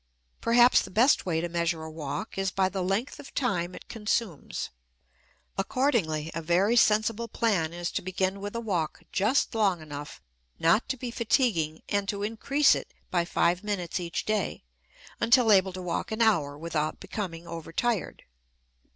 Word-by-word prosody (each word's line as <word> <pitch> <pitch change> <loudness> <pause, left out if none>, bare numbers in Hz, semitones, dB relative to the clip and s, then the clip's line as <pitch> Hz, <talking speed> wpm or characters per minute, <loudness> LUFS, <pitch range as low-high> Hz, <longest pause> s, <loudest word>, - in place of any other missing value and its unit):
Perhaps 240 +2 +6
the - - -7
best 230 0 +3
way 165 -2 +1
to 175 - -1
measure 170 -1 -1
a 160 - -7
walk 155 +6 -5
is 195 0 0
by 190 0 +1
the 190 0 -3
length 195 +8 -1
of - - -12
time 180 -9 -1
it - - -11
consumes. 210 - -2 0.9
Accordingly, 195 - 0
a 165 - -3
very 180 +8 +2
sensible 220 0 +3
plan 200 -10 0
is 175 0 -4
to - - -2
begin 190 +1 -1
with 205 +2 -5
a - - -1
walk 180 -9 -2
just 215 +9 +2
long 200 -6 +2
enough 145 -1 -8 0.4
not 170 +8 +3
to 265 - -1
be 245 0 -5
fatiguing 215 - +1
and 200 -1 -1
to 200 0 -2
increase 270 +7 +3
it - - -5 0.2
by 175 -2 +1
five 175 +1 +1
minutes 190 -5 -2
each 170 -1 -3
day 215 - -1 0.6
until 235 0 +5
able 190 -2 +5
to 185 0 -7
walk 180 +6 -3
an 220 +1 +1
hour 150 -10 +2
without 155 -1 -2
becoming 170 -5 -5
overtired. 170 +6 -2
190 Hz, 165 wpm, -28 LUFS, 170-225 Hz, 0.9 s, Perhaps